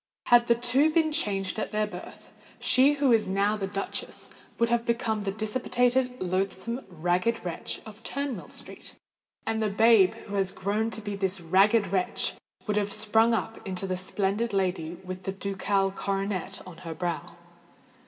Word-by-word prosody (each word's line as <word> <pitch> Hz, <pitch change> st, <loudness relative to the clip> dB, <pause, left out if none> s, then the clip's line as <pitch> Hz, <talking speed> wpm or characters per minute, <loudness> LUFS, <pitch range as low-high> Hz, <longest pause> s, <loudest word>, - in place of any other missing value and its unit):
Had 240 Hz, 0 st, +6 dB
the 235 Hz, -, +5 dB
two 250 Hz, +6 st, +3 dB
been 315 Hz, 0 st, +2 dB
changed 200 Hz, -, 0 dB
at -, -, -3 dB
their 215 Hz, 0 st, +1 dB
birth, 185 Hz, -4 st, -10 dB, 0.3 s
she 270 Hz, +3 st, +5 dB
who 280 Hz, -3 st, +2 dB
is 225 Hz, -2 st, +4 dB
now 200 Hz, +2 st, +2 dB
the 195 Hz, -2 st, -3 dB
duchess 195 Hz, 0 st, -5 dB, 0.3 s
would 235 Hz, 0 st, +2 dB
have 235 Hz, 0 st, +2 dB
become 230 Hz, -2 st, 0 dB
the 200 Hz, -1 st, -2 dB
dissipated, 245 Hz, +4 st, 0 dB
loathsome, 190 Hz, +6 st, -2 dB
ragged 180 Hz, +6 st, 0 dB
wretch 170 Hz, -2 st, -4 dB
of 215 Hz, 0 st, -11 dB
Turnmill 275 Hz, -6 st, -4 dB
Street; -, -, -8 dB, 0.5 s
and 220 Hz, 0 st, -1 dB
the 215 Hz, -, +1 dB
babe 220 Hz, -1 st, +5 dB
who 205 Hz, -, -8 dB
has 195 Hz, -2 st, +1 dB
grown 210 Hz, +4 st, -1 dB
to 220 Hz, -, -5 dB
be 205 Hz, -1 st, -4 dB
this 190 Hz, -1 st, -1 dB
ragged 195 Hz, +6 st, +4 dB
wretch, 185 Hz, -2 st, 0 dB, 0.3 s
would 210 Hz, -1 st, 0 dB
have 205 Hz, -1 st, 0 dB
sprung 220 Hz, +2 st, +3 dB
up 225 Hz, 0 st, -3 dB
into 190 Hz, -1 st, -3 dB
the 185 Hz, -1 st, -1 dB
splendid 200 Hz, +4 st, -1 dB
lady 180 Hz, -4 st, -1 dB
with 185 Hz, 0 st, -6 dB
the 190 Hz, -, -3 dB
ducal 195 Hz, 0 st, 0 dB
coronet 195 Hz, -1 st, -3 dB
on 180 Hz, -3 st, -11 dB
her 165 Hz, -2 st, -7 dB
brow. 170 Hz, 0 st, -3 dB
205 Hz, 170 wpm, -27 LUFS, 190-230 Hz, 0.5 s, Had